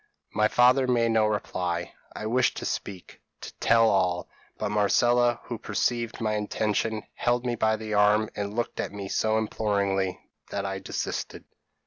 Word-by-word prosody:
p> - - -38 0.3
"My 105 0 +4
father 125 +3 +4
made 120 -2 +2
no 110 -1 +3
reply. 90 -5 -2 0.2
I - - -5
wished 125 +4 +1
to - - -5
speak 95 -3 -5 0.2
to - - -8
tell 115 -1 +4
all 90 -4 +1 0.3
but - - -2
Marcella 120 +3 +3
who 120 -3 -6
perceived 120 0 -1
my 110 -2 0
intention, 105 +1 -1
held 120 +1 0
me 120 - 0
by 110 -1 +2
the 110 0 -5
arm, 105 +1 +4
and 100 0 -4
looked 120 - -3
at - - -2
me 100 -1 -6
so 110 +2 +1
imploringly, 100 -3 0 0.3
that 100 - -3
I 95 0 -3
desisted. 95 - -4
110 Hz, 165 wpm, -27 LUFS, 100-115 Hz, 0.3 s, My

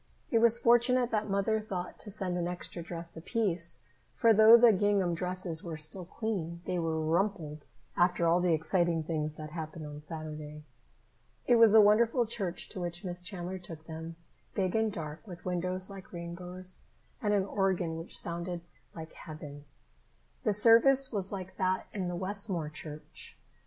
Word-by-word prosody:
It 230 - +4
was 235 0 +5
fortunate 240 +1 +3
that 215 -1 -1
Mother 200 +3 +1
thought 185 -4 -6
to - - -9
send 190 -2 -2
an 175 -1 -1
extra 175 0 -3
dress 170 0 -4
apiece, 170 - -1 0.3
for 230 -1 +5
though 220 +2 +9
the 235 -1 +6
gingham 195 -2 +1
dresses 180 -1 -1
were 165 -3 -5
still 165 +4 -2
clean, 180 -5 -4
they 180 - -1
were 160 -1 -1
rumpled 160 -2 -1 0.3
after 175 -1 +2
all 170 +2 +3
the 175 -2 +3
exciting 165 +1 0
things 155 -1 -3
that 155 0 -8
happened 160 -1 -6
on 150 0 -8
Saturday. 150 -1 -8 0.8
It 245 - +4
was 225 -2 +6
a 220 - +10
wonderful 230 +4 +4
church 195 -6 -2
to - - -7
which 175 +1 -5
Miss 180 -1 -4
Chandler 180 0 -5
took 165 -3 -10
them, 160 +1 -7 0.4
big 190 -1 0
and 220 -1 +1
dark, 155 -5 -6
with 175 -3 -10
windows 185 +1 0
like 195 -1 -10
rainbows, 180 +1 -4 0.3
and 210 - 0
an 200 -2 +2
organ 190 -4 0
which 165 - -2
sounded 170 +1 0 0.3
like 160 -1 -9
heaven. 150 -3 -10 0.8
The 210 - +2
service 235 +6 +6
was 200 -4 0
like 185 -2 -6
that 185 0 0
in 190 -3 -3
the 175 - -3
Westmore 185 -3 -1
church. 155 -1 -9
180 Hz, 165 wpm, -30 LUFS, 165-205 Hz, 0.8 s, a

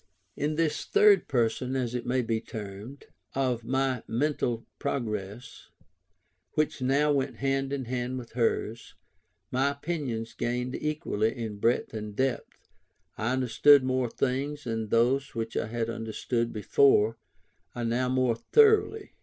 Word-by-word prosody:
In 150 +1 -1
this 160 -1 0
third 415 -1 +5
period 125 +1 0
(as 125 -2 -1
it 125 -1 -4
may 125 0 +1
be 115 -1 -1
termed) 105 +5 -8 0.3
of 125 -3 0
my 130 0 0
mental 120 -3 -1
progress, 110 -5 -4 0.8
which 155 -3 0
now 140 +4 +3
went 135 -3 0
hand 135 +2 -1
in 140 -2 -2
hand 125 +1 -3
with 120 -2 -8
hers, 115 -1 -1 0.6
my 135 +2 +2
opinions 140 -6 -4
gained 125 +1 -2
equally 150 -9 -1
in 110 -3 -5
breadth 115 +2 +1
and 105 -1 -6
depth, 130 0 -2 0.5
I 110 +3 -1
understood 130 +2 +5
more 130 -1 0
things, 140 +4 -2
and 115 -2 -3
those 130 +5 +2
which 115 0 -4
I - - -1
had 115 0 -2
understood 115 +1 -2
before 115 +1 +3 0.6
I 120 - -3
now 120 +2 0
understood 130 - 0
more 130 -3 +2
thoroughly. 435 - +3
125 Hz, 140 wpm, -28 LUFS, 115-135 Hz, 0.8 s, third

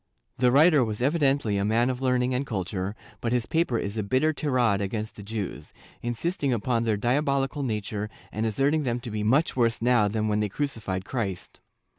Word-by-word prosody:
The 125 -1 +4
writer 150 +1 +6
was 110 +1 -3
evidently 140 -7 +2
a 100 - 0
man 115 +4 +2
of 125 0 -6
learning 125 -1 +1
and 125 +2 0
culture, 95 -1 -3 0.2
but 115 - -2
his 120 -2 +1
paper 160 -7 +1
is 100 0 -3
a - - +1
bitter 130 +9 +1
tirade 125 -9 +1
against 105 +2 -3
the - - -10
Jews, 100 -8 -5 0.3
insisting 140 +5 -1
upon 115 0 0
their 110 -2 +1
diabolical 135 +4 0
nature 105 -3 -3 0.2
and 110 - -2
asserting 140 +8 +1
them 125 -3 -1
to 120 - -7
be 105 0 -2
much 130 +10 +2
worse 115 -2 +2
now 120 -3 +3
than 110 +1 -1
when 105 0 +1
they 105 -1 0
crucified 105 -7 -3
Christ. 100 -8 -4
120 Hz, 190 wpm, -26 LUFS, 105-135 Hz, 0.3 s, writer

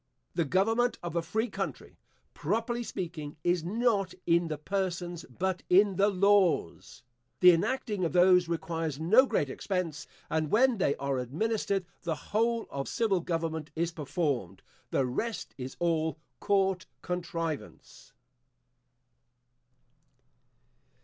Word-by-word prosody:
The 170 - +1
government 225 - +2
of 175 -1 -5
a 170 - +2
free 220 +8 -1
country, - - -6 0.3
properly 235 +1 -1
speaking, 165 -9 -5
is 175 -1 +1
not 205 0 0
in 170 0 +3
the 155 -1 -3
persons, 175 0 -3
but 185 +8 -2
in 195 +2 +5
the 200 +1 +4
laws. 190 -9 +2 0.4
The 180 0 +9
enacting 210 +2 0
of 165 - 0
those 180 0 +5
requires 165 -3 -2
no 220 +12 +5
great 145 - +1
expense; 165 +1 -3 0.2
and 155 -1 -1
when 240 - +3
they 140 - +2
are 135 -1 -2
administered, 195 - -1 0.2
the 165 -2 -2
whole 230 +7 0
of 140 0 -3
civil 215 -5 +1
government 165 -2 -3
is 170 +1 0
performed 145 - -2 0.3
the 135 - +1
rest 130 - -3
is 130 +1 -6
all 160 -2 0 0.2
court 195 -3 +1 0.2
contrivance. 170 -3 -5
175 Hz, 125 wpm, -30 LUFS, 160-200 Hz, 0.4 s, The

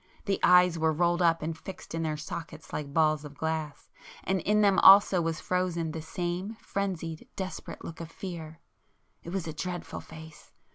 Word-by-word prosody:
The 200 -2 0
eyes 180 -1 +5
were 160 0 +3
rolled 175 +2 +1
up 165 -2 +3
and 160 +1 -2
fixed 185 +2 -10
in 165 - -2
their 155 -2 -1
sockets 160 +1 -8
like 145 -2 -4
balls 155 -1 +2
of 145 -1 -10
glass, 160 -2 -3 0.3
and 190 -1 0
in 210 +4 +2
them 200 -2 +4
also 195 -2 +8
was 165 -1 -2
frozen 180 -3 -1
the 160 - -5
same 175 +6 -3
frenzied 180 -7 -4
desperate 190 -2 -6
look 165 - -8
of 165 - -7
fear. 165 -2 -8 0.6
It - - -9
was 185 -1 -3
a 160 - -5
dreadful 175 +3 -5
face! 160 -1 -13
165 Hz, 180 wpm, -29 LUFS, 160-185 Hz, 0.6 s, also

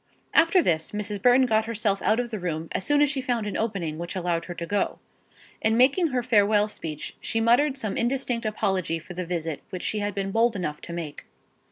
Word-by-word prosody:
After 335 +2 +5
this 160 +1 0
Mrs. 210 -1 -3
Burton 250 +3 +5
got 220 -2 +2
herself 215 -3 0
out 220 - +2
of 240 -1 -3
the 215 - -3
room 165 -2 -3
as - - -2
soon 290 +4 +3
as 295 - +3
she 275 -3 -2
found 245 -4 -1
an 205 - -4
opening 180 -8 -2
which 170 +2 -5
allowed 175 -2 -1
her 175 - -7
to 170 - -5
go. 205 +3 -1 0.6
In 220 +1 +2
making 280 +8 +4
her 255 -4 -1
farewell 210 -3 +3
speech, 155 -7 -6
she 225 - -1
muttered 250 +5 +3
some 215 -6 -2
indistinct 240 -2 0
apology 190 -6 0
for 170 +2 -10
the 180 0 -5
visit 165 -3 -3
which 185 - -6
she 215 - -1
had 205 -1 -2
been 195 -1 -2
bold 225 +2 +2
enough 150 -6 -3
to 170 - -8
make. 165 -4 -6
210 Hz, 220 wpm, -25 LUFS, 175-240 Hz, 0.6 s, After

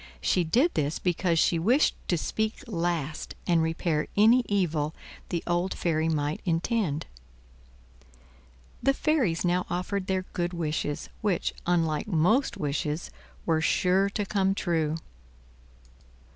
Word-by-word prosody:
She 175 - +2
did 250 - +2
this 150 +1 0
because 175 -1 0
she 165 +1 +3
wished 245 - +3
to 175 - +2
speak 220 - -2
last 170 - -2
and 170 -2 +3
repair 160 -1 0
any 230 +4 +6
evil 160 -6 0 0.3
the 170 - -2
old 175 +2 0
fairy 160 -1 0
might 150 -1 -1
intend. 170 -2 0 1.8
The 275 +2 +3
fairies 255 - +1
now 180 +1 +1
offered 185 +2 -2
their 190 -1 0
good 175 0 -1
wishes, 150 -3 -2
which, 200 -5 0
unlike 165 -3 +1
most 215 - +2
wishes, 150 +2 -2 0.3
were 160 -1 +2
sure 185 +4 +2
to 205 +1 -2
come 195 -1 +1
true. 160 -5 0
175 Hz, 125 wpm, -27 LUFS, 160-200 Hz, 1.8 s, any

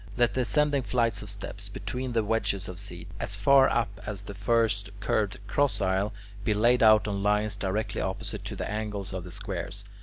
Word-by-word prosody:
Let 120 -1 +3
the 130 - +1
ascending 145 +2 +2
flights 115 -2 +1
of 105 - -6
steps 100 0 -5
between 120 +6 -4
the 115 -1 +2
wedges 105 -3 0
of 90 0 -6
seats, 90 -4 -7
as 100 - 0
far 135 +6 +6
up 100 -4 -1
as 105 -2 -5
the 100 - -7
first 105 -1 +1
curved 100 0 0
cross 140 +6 +1
aisle, 95 +1 +1 0.3
be 105 -1 +1
laid 120 +4 +4
out 110 -1 +6
on 100 -1 -2
lines 105 +1 +1
directly 100 +2 -2
opposite 95 0 -4
to - - -4
the - - -3
angles 105 -2 -3
of 95 -1 -4
the 90 - -8
squares. - - -5
105 Hz, 195 wpm, -28 LUFS, 100-115 Hz, 0.3 s, far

